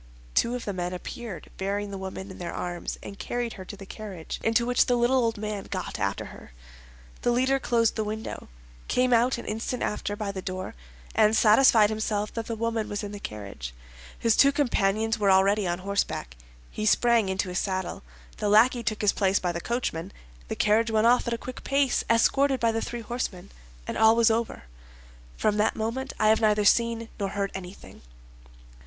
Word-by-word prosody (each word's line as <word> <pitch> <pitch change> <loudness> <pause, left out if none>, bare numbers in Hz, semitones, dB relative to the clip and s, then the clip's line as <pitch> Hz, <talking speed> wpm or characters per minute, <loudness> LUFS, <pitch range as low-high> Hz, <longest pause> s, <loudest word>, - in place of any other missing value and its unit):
Two 240 +1 +2
of 245 - -5
the 205 - -2
men 180 -1 -3
appeared, 205 +2 -7
bearing 200 +1 -2
the 195 - -5
woman 190 +1 -6
in - - -11
their 175 - -5
arms, 175 -1 -4
and 200 - -9
carried 240 -1 -3
her 185 - -9
to 205 - -9
the 195 - -10
carriage, 190 -5 -7
into 225 +1 +2
which 245 0 +3
the 245 - +3
little 240 +2 +3
old 225 -1 0
man 210 -1 -4
got 185 -2 -5
after 100 - -1
her. - - -14 0.7
The - - +1
leader 260 +3 +2
closed 230 -3 +1
the 220 - -1
window, 215 - -6 0.4
came 250 0 +2
out 240 +2 +3
an 235 - -7
instant 225 +3 -3
after 205 -1 -2
by 205 -1 -3
the 190 -1 -6
door, 185 0 -5 0.4
and 215 0 +4
satisfied 220 -1 +6
himself 215 -1 -2
that 230 -1 -4
the 230 - -3
woman 225 -1 -2
was 205 +1 -3
in 205 - -5
the 205 - -7
carriage. 100 - -7 0.4
His 230 -2 +2
two 280 - +6
companions 225 -5 +1
were 200 -2 +3
already 195 +1 +4
on 175 0 -1
horseback. 190 - -2 0.4
He 215 - -2
sprang 235 -2 +3
into 190 0 -1
his 180 - -1
saddle; 185 -2 -3 0.4
the 210 - -1
lackey 235 +4 +5
took 215 -2 -2
his 205 - +4
place 195 -1 +2
by 180 - -1
the 170 0 -4
coachman; 195 -7 -3 0.4
the - - -3
carriage 220 +2 +3
went 220 0 +2
off 245 +1 +4
at 235 - 0
a - - -5
quick 255 +2 -8
pace, 275 -2 +1
escorted 265 +4 +3
by 230 -1 +2
the 225 0 -2
three 240 -1 -5
horsemen, 225 -6 -5 0.3
and - - -4
all 220 0 +6
was 230 -1 +4
over. 225 - -2 0.7
From 210 -1 +1
that 210 +1 +2
moment 235 +5 -3
I 215 - +4
have 220 - +4
neither 210 -1 +3
seen 230 +1 +2
nor 200 -1 -1
heard 200 0 -2
anything." 190 0 -9
215 Hz, 200 wpm, -26 LUFS, 195-235 Hz, 0.7 s, satisfied